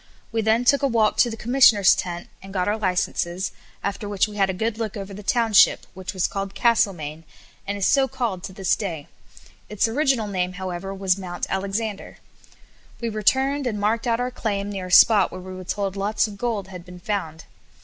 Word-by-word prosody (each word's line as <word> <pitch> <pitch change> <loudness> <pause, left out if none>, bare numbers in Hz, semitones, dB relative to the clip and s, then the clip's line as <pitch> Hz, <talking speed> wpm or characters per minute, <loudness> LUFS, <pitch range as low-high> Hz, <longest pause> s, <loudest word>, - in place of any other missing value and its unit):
We 225 0 0
then 220 +3 +2
took 280 +3 +4
a 280 - +3
walk 225 -4 +2
to 240 - +4
the 225 - -6
Commissioner's 230 -5 +5
tent, 175 -1 -4
and 195 - -11
got 185 -2 -1
our 205 - +1
licences, 185 -2 -1 0.3
after 200 +1 -3
which 200 -1 +1
we 210 - -10
had 195 -2 +2
a - - +2
good 220 +4 -2
look 220 -2 -3
over 195 0 -7
the 205 - -8
township, 225 0 +4
which 185 -1 -6
was 185 -2 0
called 195 0 -4
Castlemaine, 175 -10 +1 0.4
and 200 0 -2
is 195 - 0
so 275 -1 +4
called 220 -9 -3
to - - -7
this 190 -1 0
day. 165 -9 -5 0.6
Its 210 +1 +1
original 265 -1 +1
name, 185 -2 -2
however, 185 0 -5
was 195 -1 0
Mount 175 -2 -4
Alexander. 200 +2 -3 0.8
We 235 - -2
returned, 265 +6 +1
and 210 -4 -2
marked 225 +4 0
out 230 0 +1
our 250 +1 -1
claim 205 -4 -3
near 190 -2 -5
a - - -9
spot 205 0 +6
where - - -7
we 185 +1 -9
were 185 0 -8
told 195 +1 -3
lots 200 +2 +1
of 210 - -9
gold 205 -3 -3
had 180 -2 -9
been 180 0 -12
found. 175 -5 -4
200 Hz, 205 wpm, -23 LUFS, 185-225 Hz, 0.8 s, spot